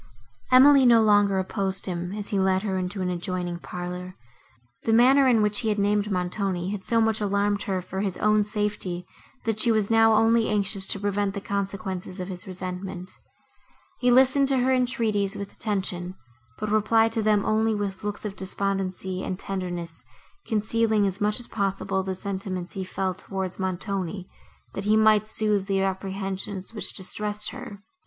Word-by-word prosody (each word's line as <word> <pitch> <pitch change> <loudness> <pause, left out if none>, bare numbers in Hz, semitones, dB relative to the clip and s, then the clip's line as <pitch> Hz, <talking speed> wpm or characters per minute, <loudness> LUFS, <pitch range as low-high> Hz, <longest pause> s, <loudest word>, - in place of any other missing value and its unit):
Emily 270 +2 +8
no 240 -2 +7
longer 205 -2 +4
opposed 190 0 -2
him, 175 -1 -3
as 210 -1 -4
he 200 - 0
led 190 0 +2
her 195 -3 -1
into 185 +1 -3
an 180 - -1
adjoining 175 0 -3
parlour; 180 +1 -6 0.7
the 225 - +1
manner, 260 +4 +6
in 230 -4 +4
which 210 -1 +2
he 225 - 0
had 210 - 0
named 205 +1 +1
Montoni, 180 0 -1
had 205 -2 -5
so 230 +3 +1
much 220 -1 +1
alarmed 205 0 +1
her 185 -2 -1
for 190 +2 -5
his 195 -3 -2
own 210 0 +3
safety, 205 -4 -2 0.4
that 220 -1 -1
she 235 - +4
was 215 -1 +1
now 225 0 +5
only 225 +1 +3
anxious 200 -2 0
to 200 - +1
prevent 205 0 -1
the - - -2
consequences 195 -2 -4
of 180 +1 -5
his 180 -2 -6
just - - -8
resentment. 185 0 -6 0.9
He 250 - +2
listened 265 +2 +5
to 270 -1 +2
her 255 +1 +2
entreaties, 220 -5 +1
with 200 -1 -6
attention, 185 -4 -3 0.4
but 215 -1 -3
replied 225 +1 +3
to 225 - 0
them 210 -1 +2
only 220 0 +2
with 200 -2 -4
looks 205 +1 -3
of 200 -2 -4
despondency 190 -1 -3
and 185 - -3
tenderness, 175 -4 -4 0.4
concealing, 220 -1 +1
as 195 +1 -3
much 210 +3 +2
as 245 - +4
possible, 195 -2 -1
the 190 0 -3
sentiments 190 -2 -4
he 190 - -4
felt 185 0 -3
towards 190 -2 -5
Montoni, 190 0 -3 0.5
that 195 - -5
he 215 +1 +4
might 215 -1 +4
soothe 210 -3 0
the 195 -1 +1
apprehensions, 195 +1 -3
which 215 - -3
distressed 210 +2 -3
her. 200 -1 -9
200 Hz, 175 wpm, -25 LUFS, 190-215 Hz, 0.9 s, Emily